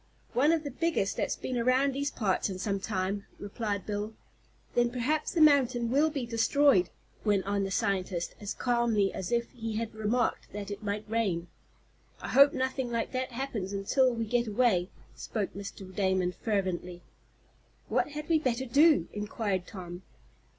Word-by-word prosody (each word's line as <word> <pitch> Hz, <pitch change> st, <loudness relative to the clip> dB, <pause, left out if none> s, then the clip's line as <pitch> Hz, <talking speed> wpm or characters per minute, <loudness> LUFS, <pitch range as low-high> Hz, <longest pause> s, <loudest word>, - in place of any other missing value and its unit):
"One 285 Hz, +5 st, +4 dB
of 330 Hz, -2 st, +1 dB
the 285 Hz, -, -4 dB
biggest 295 Hz, -8 st, 0 dB
that's -, -, 0 dB
been 255 Hz, -2 st, -3 dB
around 255 Hz, +3 st, +3 dB
these 280 Hz, +2 st, -1 dB
parts 205 Hz, -7 st, 0 dB
in 190 Hz, -, -4 dB
some 200 Hz, +1 st, -1 dB
time," 195 Hz, 0 st, -2 dB
replied 205 Hz, -1 st, -3 dB
Bill. 210 Hz, +1 st, -3 dB, 0.6 s
"Then 240 Hz, 0 st, +3 dB
perhaps 255 Hz, +6 st, -1 dB
the 335 Hz, -, +1 dB
mountain 255 Hz, -6 st, +4 dB
will 295 Hz, +4 st, +4 dB
be 280 Hz, -5 st, -3 dB
destroyed," 230 Hz, -3 st, +3 dB, 0.3 s
went 205 Hz, -3 st, +2 dB
on 200 Hz, 0 st, 0 dB
the -, -, -3 dB
scientist, 185 Hz, -2 st, -1 dB
as 205 Hz, -1 st, -5 dB
calmly 235 Hz, -5 st, +1 dB
as 190 Hz, +2 st, -4 dB
if 235 Hz, 0 st, 0 dB
he 225 Hz, -3 st, -5 dB
had 225 Hz, 0 st, -3 dB
remarked 220 Hz, +3 st, -1 dB
that 205 Hz, 0 st, -5 dB
it 205 Hz, +1 st, -6 dB
might 210 Hz, 0 st, -3 dB
rain. 195 Hz, -7 st, -1 dB, 0.7 s
"I -, -, -6 dB
hope 280 Hz, +2 st, +7 dB
nothing 260 Hz, -2 st, -2 dB
like 230 Hz, -1 st, -1 dB
that 255 Hz, -1 st, -3 dB
happens 230 Hz, -7 st, -3 dB
until 250 Hz, +7 st, +2 dB
we 230 Hz, -1 st, -2 dB
get 240 Hz, +1 st, +1 dB
away," 205 Hz, -5 st, +2 dB, 0.3 s
spoke 210 Hz, -4 st, -3 dB
Mr. 195 Hz, -1 st, -8 dB
Damon, 190 Hz, -2 st, +1 dB
fervently. 180 Hz, -4 st, -2 dB, 0.8 s
"What -, -, +1 dB
had 300 Hz, 0 st, -5 dB
we 325 Hz, -2 st, +3 dB
better 260 Hz, -3 st, -1 dB
do?" 295 Hz, +5 st, +5 dB
inquired 205 Hz, -3 st, -2 dB
Tom. 180 Hz, -3 st, -8 dB
225 Hz, 165 wpm, -30 LUFS, 195-255 Hz, 0.8 s, hope